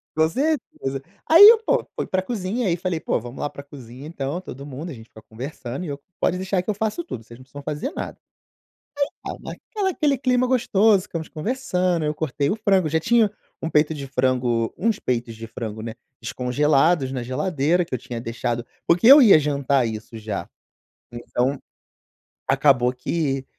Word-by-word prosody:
Com 160 0 +4
certeza. 235 - -2 0.3
Aí 355 +6 +11
eu 460 - +8
pô, - - +1
fui - - -2
pra 185 0 0
cozinha 210 +2 -2
aí 170 - +2
falei: 175 -2 -2
"Pô - - -1
vamos 120 +3 -9
lá 145 - -2
pra 140 - -10
cozinha 135 -1 -11
então 155 +2 -4
todo 140 -5 -9
mundo 145 +5 -7
a - - -6
gente 110 -2 -12
fica 110 - -15
conversando 130 +6 -7
e - - -6
eu 140 0 -5 0.2
pode 180 - +2
deixar 190 0 -1
que 185 - -9
eu - - +2
faço 220 - -2
tudo 115 - -7
vocês 115 +2 -14
não - - -13
precisam 140 +2 -11
fazer 150 - -3
nada." - - -6 0.9
Aí - - -12 0.2
tá, - - -12
naquela 400 -3 -3
aquele 290 -5 +1
clima 250 -1 +2
gostoso 220 -5 +3
ficamos 165 -3 -6
conversando 180 -4 -1
eu 150 0 0
cortei 145 -2 -1
o 210 - 0
frango, 195 -6 +2
já 160 +1 +1
tinha 225 +1 +3 0.3
um 160 - -2
peito 150 +1 +3
de 140 -2 -6
frango 125 -3 0
uns 225 0 +1
peitos 120 -2 -2
de 115 +1 -8
frango, 110 -1 -6
né, 115 -1 -6 0.3
descongelados 135 +3 +2
na 130 -2 -3
geladeira 155 +6 0
que 160 - -6
eu - - -1
tinha 120 -1 -6
deixado 120 0 -3 0.2
porque 180 +7 +3
eu 280 +3 +11
ia 205 -10 +8
jantar 140 -3 +1
isso 110 +1 -6
já. 105 -2 -5 0.6
Então, 125 +3 -1 0.9
acabou 135 -2 +3
que 135 0 -2
150 Hz, 190 wpm, -23 LUFS, 125-190 Hz, 0.9 s, Aí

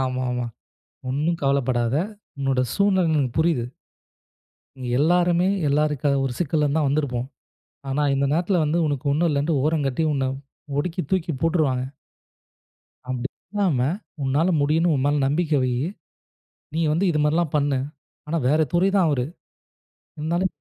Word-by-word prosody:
ஆமா, 130 -1 -1
ஆமாம். 120 -2 -3 0.6
ஒண்ணும் 155 +6 0
கவலைப்படாத. 130 -2 +1 0.4
உன்னோட 135 -2 +1
சூழ்நிலை 195 -3 +3
எனக்குப் 140 -5 0
புரியுது. 160 -7 +2 1.1
இங்க 130 -1 -6
எல்லாருமே 175 +3 +3 0.2
எல்லாருக்கா 150 -1 +1
ஒரு 130 - -1
சிக்கல்தான் 150 -2 +1
வந்துருப்போம். 135 -4 -1 0.6
ஆனா 140 +2 0
இந்த 140 +1 +1
நேரத்துல 175 +1 +2
வந்து 155 +3 +1
உனக்கு 145 -1 -2
ஒண்ணும் 165 +3 +2
இல்லன்னு 145 0 +1
ஓரங்கட்டி, 155 -1 0
உன்னை 135 -1 0 0.5
ஒடுக்கி 180 +4 -1
தூக்கிப் 165 -7 -1
போட்டுருவாங்க. 150 -7 +1 1.2
அப்படி 130 0 -2 0.2
இல்லாமல், 165 -8 +1 0.3
உன்னால் 145 +7 +2
முடியும்னு 160 +3 +2
உன் 135 -1 0
மேல 145 +1 +2
நம்பிக்கை 150 0 +1
வையி. 125 +4 0 0.9
நீ 165 - +1
வந்து 175 +6 +1
இது 150 - 0
மாதிரில்லாம் 155 +1 +1
பண்ணு. 140 -2 +1 0.5
ஆனா 165 +2 0
வேற 155 +3 +3
துறைதான் 190 0 +3
அவரு. 125 -4 0 0.9
இருந்தாலும் 170 +4 0
150 Hz, 130 wpm, -23 LUFS, 135-165 Hz, 1.2 s, சூழ்நிலை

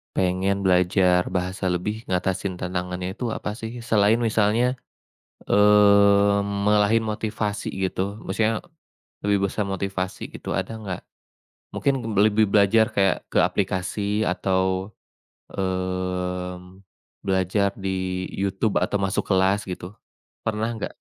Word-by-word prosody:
pengen 95 +2 0
belajar 90 0 +3
bahasa 95 +1 -2
lebih, 105 +5 -2
ngatasin 95 +1 -1
tantangannya 90 0 -3
itu 115 +5 -5
apa - - -4
sih 115 +1 -6
selain 110 -2 +3
misalnya, 115 +3 +2 0.6
eee, 100 0 +5
ngalahin 105 +2 +2
motivasi 105 -1 -3 0.2
gitu 95 +2 -2
maksudnya 110 +3 0 0.6
lebih 100 -1 +2
besar 105 - -1
motivasi 95 -1 -3
gitu - - -8
ada - - -3
nggak? 95 -4 -5 0.7
Mungkin 140 - +1 0.2
lebih 110 +1 +4
belajar 110 +3 +4
kayak 95 -2 +2
ke - - +4
aplikasi 100 +3 -1
atau, 95 +2 0 0.6
eee, 90 -1 -3 0.6
belajar 95 +1 +1
di 95 -1 -2
YouTube 100 +2 0
atau - - 0
masuk 95 0 0
kelas 95 +1 +2
gitu, 90 0 -6 0.5
pernah 110 +1 -1
nggak? 110 - -5
100 Hz, 110 wpm, -24 LUFS, 95-105 Hz, 0.7 s, eee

